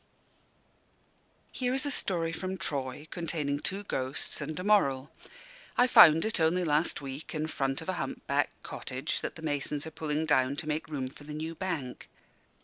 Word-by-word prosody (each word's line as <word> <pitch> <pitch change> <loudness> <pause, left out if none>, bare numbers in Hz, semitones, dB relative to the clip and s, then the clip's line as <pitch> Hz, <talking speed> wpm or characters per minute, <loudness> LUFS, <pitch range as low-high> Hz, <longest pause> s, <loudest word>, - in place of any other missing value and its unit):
Here 250 0 -1
is 270 - 0
a 285 - -1
story 170 -9 0
from 185 +3 -4
Troy, 140 -2 -4
containing 150 -4 -2
two 195 +6 -2
ghosts 135 -5 -2
and 155 +3 -4
a - - -3
moral. 145 -10 +3 0.7
I 245 - +7
found 165 -9 +8
it, 220 -3 +1
only 165 +3 +3
last 155 0 +1
week, 135 +4 -6
in 155 0 0
front 135 -3 -1
of - - -6
a - - +1
hump 135 - -5
backed - - 0
cottage - - -3
that - - -4
the 160 - -10
masons 145 -1 -1
are 160 - -6
pulling 155 0 -1
down 140 -3 +3
to 150 - -4
make 150 -1 -1
room 135 -4 -2
for 145 - -14
the 150 0 -7
new 160 +2 -4
Bank. 165 -8 -4
155 Hz, 180 wpm, -30 LUFS, 140-175 Hz, 0.7 s, found